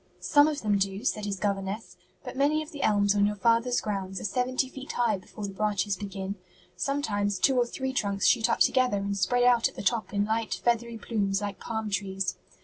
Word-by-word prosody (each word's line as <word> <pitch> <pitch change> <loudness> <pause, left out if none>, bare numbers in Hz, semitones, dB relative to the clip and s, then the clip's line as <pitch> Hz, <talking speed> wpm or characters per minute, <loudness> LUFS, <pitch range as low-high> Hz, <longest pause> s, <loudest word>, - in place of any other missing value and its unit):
"Some 290 -1 +5
of 295 -4 -2
them 205 -2 +2
do," 195 +4 -2
said 210 -4 0
his 200 -1 -2
governess, 200 +2 -3 0.3
"but - - -7
many 295 +3 +2
of 310 - -12
the 290 - -7
elms 205 -1 +3
on 205 0 +3
your 210 - -2
father's 230 +3 +2
grounds 195 -2 -3
are - - -8
seventy 255 +5 0
feet 265 +1 -8
high 230 -5 +1
before 205 +2 -8
the 195 - -6
branches 205 0 0
begin. 195 0 -5 0.4
Sometimes 205 -3 -1
two 265 +8 +3
or 245 -1 +3
three 265 +2 -4
trunks 200 -5 0
shoot 235 -1 +4
up - - 0
together 255 -5 +3
and 200 0 -2
spread 245 +6 +2
out 245 -2 +4
at - - -19
the - - -6
top 220 +3 0
in 205 0 +1
light, 220 +1 -1
feathery 235 -1 0
plumes 200 -4 -1
like 205 -2 -5
palm 220 -2 -4
trees. 195 -1 -2
210 Hz, 215 wpm, -28 LUFS, 200-245 Hz, 0.4 s, Some